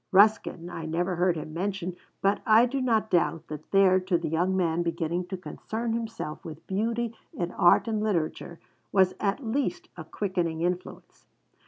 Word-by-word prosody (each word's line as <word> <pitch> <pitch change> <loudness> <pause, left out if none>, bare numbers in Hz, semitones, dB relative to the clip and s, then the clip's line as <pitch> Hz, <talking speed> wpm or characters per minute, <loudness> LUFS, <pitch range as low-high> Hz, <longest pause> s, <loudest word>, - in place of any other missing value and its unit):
Ruskin, 195 -3 +4
I 165 -2 -6
never 175 +3 -1
heard 180 0 +3
him 155 0 -6
mention, 185 0 -3 0.3
but 195 +1 +2
I 220 +2 +6
do 265 +2 -2
not 225 -4 +1
doubt 170 -2 +1
that 150 -1 -8
there, 195 -1 +5
to 185 -1 +1
the 165 -1 -3
young 180 +4 +1
man 170 -2 +1
beginning 170 +1 -2
to 190 +1 -4
concern 225 +5 -4
himself 225 -9 -4
with 160 0 -9
beauty 230 +3 -1 0.2
in 175 0 -3
art 175 +6 +4
and 215 -2 0
literature, 170 -4 -2 0.3
was 190 -2 +4
at 205 +6 -1
least 230 -5 -2
a 165 - -7
quickening 170 -2 -2
influence. 180 +1 -4
185 Hz, 170 wpm, -27 LUFS, 170-215 Hz, 0.3 s, I